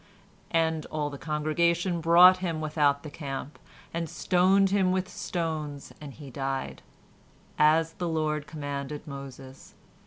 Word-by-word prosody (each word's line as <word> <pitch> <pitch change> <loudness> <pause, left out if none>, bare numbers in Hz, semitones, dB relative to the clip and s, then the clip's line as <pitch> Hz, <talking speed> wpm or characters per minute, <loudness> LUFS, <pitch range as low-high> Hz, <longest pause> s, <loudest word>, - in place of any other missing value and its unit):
"And 160 -2 0
all 150 -1 -3
the 140 - -8
congregation 170 +3 0
brought 175 +3 +7
him 170 -4 -3
without 150 -2 +1
the 150 - -8
camp, 140 -1 -6 0.3
and 165 -1 -3
stoned 190 +3 +3
him 190 -2 +3
with 185 0 0
stones, 155 -6 -4
and 145 -2 -8
he 140 0 -11
died; 135 +1 -4 0.8
as 160 +2 +4
the 175 0 -3
Lord 155 -2 -1
commanded 145 -1 -5
Moses. 135 -1 -10
155 Hz, 130 wpm, -28 LUFS, 145-170 Hz, 0.8 s, brought